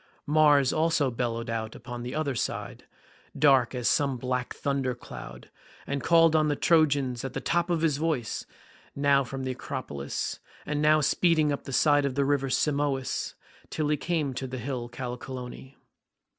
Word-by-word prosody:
Mars 145 -3 +4
also 155 -4 +2
bellowed 115 -1 -2
out 110 -1 -3
upon 120 +1 -7
the 125 +2 -5
other 155 -3 -1
side, 115 - -4 0.5
dark 135 -4 +4
as 125 -1 -1
some 140 -3 +2
black 125 0 -3
thunder 135 -3 -1
cloud, 65 - -10 0.3
and 140 0 -2
called 165 -1 +5
on 155 -1 +3
the 145 - +1
Trojans 140 -7 +2
at 135 -1 -5
the - - -2
top 175 0 0
of 170 -2 +1
his 155 -4 +2
voice, 150 -7 -2 0.5
now 140 -1 +3
from 135 +1 -6
the 130 - -2
acropolis, 125 - -4 0.3
and 150 0 -1
now 155 0 +5
speeding 155 0 +3
up 140 - -4
the - - -6
side 145 +1 +4
of 135 -2 -2
the 140 -1 +2
river 140 -1 +1
Simois 140 -1 0 0.3
till 155 -2 -1
he 150 - +3
came 155 -3 -1
to 130 +1 -4
the 130 +1 -5
hill 120 -1 -4
Callicolone. 125 +1 -7
140 Hz, 170 wpm, -27 LUFS, 125-150 Hz, 0.5 s, called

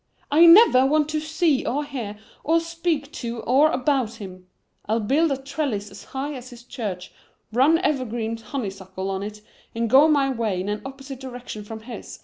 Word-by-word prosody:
"I 325 +4 +7
never 335 - +8
want 300 +2 +2
to 310 0 -1
see 310 -2 +1
or 290 +3 -1
hear 230 -7 -6 0.3
or 330 +2 +3
speak 330 -3 -2
to 235 -7 -5
or 275 +7 +4
about 255 -4 0
him. 185 -4 -10 0.4
I'll 220 +2 +1
build 280 +9 +2
a 275 - 0
trellis 265 -7 -3
as 200 - -12
high 275 +2 -4
as 255 -2 -9
his 240 -2 -13
church, 205 -8 -6 0.4
run 275 +7 +5
evergreen 240 -9 -1
honeysuckle 195 -5 -5
on 190 0 -3
it 210 +1 -7 0.3
and 230 0 0
go 280 +4 +7
my 280 -3 +3
way 225 -7 -1
in 190 +3 -3
an 210 0 -3
opposite 270 -1 -8
direction 245 -5 -8
from 220 +1 -8
his. 230 -1 -9
255 Hz, 180 wpm, -23 LUFS, 215-295 Hz, 0.4 s, never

